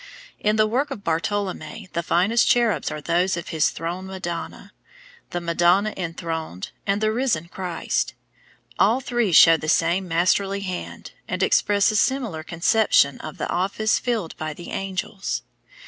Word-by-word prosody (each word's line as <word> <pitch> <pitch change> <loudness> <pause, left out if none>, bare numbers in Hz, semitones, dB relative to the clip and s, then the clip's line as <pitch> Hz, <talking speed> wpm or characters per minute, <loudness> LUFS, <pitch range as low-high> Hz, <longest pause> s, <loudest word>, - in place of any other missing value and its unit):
In 210 0 +1
the 215 0 +4
work 255 +7 0
of 235 -8 -7
Bartolommeo 195 +4 -2
the 170 - 0
finest 190 +8 +2
cherubs 235 -3 +2
are 150 - -5
those 175 +4 +1
of 170 - -6
his 160 -2 +2
Throne 175 +3 -5
Madonna, 185 -3 -6 0.6
the 175 - -3
Madonna 175 +5 +2
Enthroned, 165 - -5 0.2
and 200 +1 +1
the 215 0 +2
Risen 225 -9 0
Christ. 180 -3 -2 0.6
All 225 +6 +4
three 240 -6 0
show 165 0 +8
the 155 - -4
same 175 +4 +2
masterly 195 +4 +1
hand, 185 -2 -6 0.2
and - - -1
express 205 +1 +3
a - - -3
similar 230 -8 0
conception 165 - +2
of 155 - -8
the - - -3
office 200 +4 0
filled 225 -9 -2
by 155 -1 -4
the 175 - -9
angels. 195 +1 -3
185 Hz, 150 wpm, -23 LUFS, 170-215 Hz, 0.6 s, show